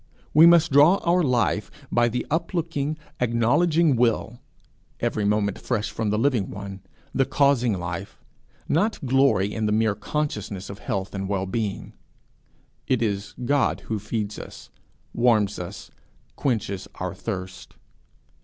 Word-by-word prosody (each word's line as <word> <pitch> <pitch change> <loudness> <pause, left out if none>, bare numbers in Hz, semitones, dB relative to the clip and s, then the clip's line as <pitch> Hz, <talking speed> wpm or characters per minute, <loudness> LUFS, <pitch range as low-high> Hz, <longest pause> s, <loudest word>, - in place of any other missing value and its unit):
We 160 +2 +8
must 170 -3 +5
draw 145 +7 +7
our 175 +1 +3
life, 125 -6 +1 0.2
by 120 0 +3
the 125 +2 -2
uplooking, 160 -3 -1 0.2
acknowledging 130 +7 +3
will, 120 0 0 0.6
every 105 - -1
moment 105 -1 +1
fresh 110 -4 -2
from 110 -2 -2
the 105 - +1
living 120 -4 +1
one, 100 -1 -7 0.3
the 135 - +3
causing 135 -4 +2
life, 90 +2 -6 0.5
not 180 -1 0
glory 125 -7 +3
in 110 -1 -1
the - - 0
mere 110 0 +2
consciousness 105 -5 -4
of 100 - -10
health 95 0 -3
and 95 -1 -2
being. 105 -3 -3 0.9
It 125 -3 +1
is 100 -1 -2
God 140 +2 +1 0.2
feeds 105 0 -4
us, - - -11 0.4
warms 110 -4 +2
us, 90 - -8 0.4
quenches 110 -7 -2
our - - -4
thirst. 95 0 -6
115 Hz, 130 wpm, -24 LUFS, 100-140 Hz, 0.9 s, We